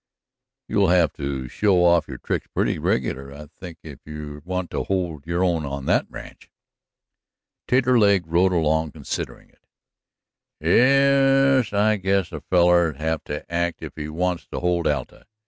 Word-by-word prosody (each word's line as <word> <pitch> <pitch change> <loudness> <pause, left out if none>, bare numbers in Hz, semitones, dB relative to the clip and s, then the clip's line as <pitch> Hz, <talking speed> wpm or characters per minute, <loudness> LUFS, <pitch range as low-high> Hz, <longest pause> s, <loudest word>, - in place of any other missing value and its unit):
You'll 100 -3 +2
have 85 -4 +3
to 70 -2 -4
show 90 - +2
off 85 -3 +3
your 65 - -7
tricks - - -3
pretty - - 0
regular, 65 +2 -2
I 75 +2 -10
think, 85 -3 -9
if 75 -4 -10
you 75 -1 -8
want 90 0 -4
to - - -3
hold 85 -6 -3
your 85 +2 0
own 85 -4 +1
in 70 -1 -5
that - - +1
ranch." - - -12 1.2
Taterleg 120 -7 +3
rode 85 +4 +2
along 80 -2 0
considering - - -6
it. - - -34 1.0
"Ye 135 +1 +4
es, 120 - -3
I 105 +1 +2
guess 95 -1 0
a - - -7
feller'll 85 -3 +3
have 80 +2 -2
to 75 0 -6
act 85 0 -2
if - - -7
he 75 -1 -6
wants 90 +2 -2
to - - -5
hold 90 -1 0
Alta. 70 -4 -4
85 Hz, 160 wpm, -23 LUFS, 75-95 Hz, 1.2 s, Ye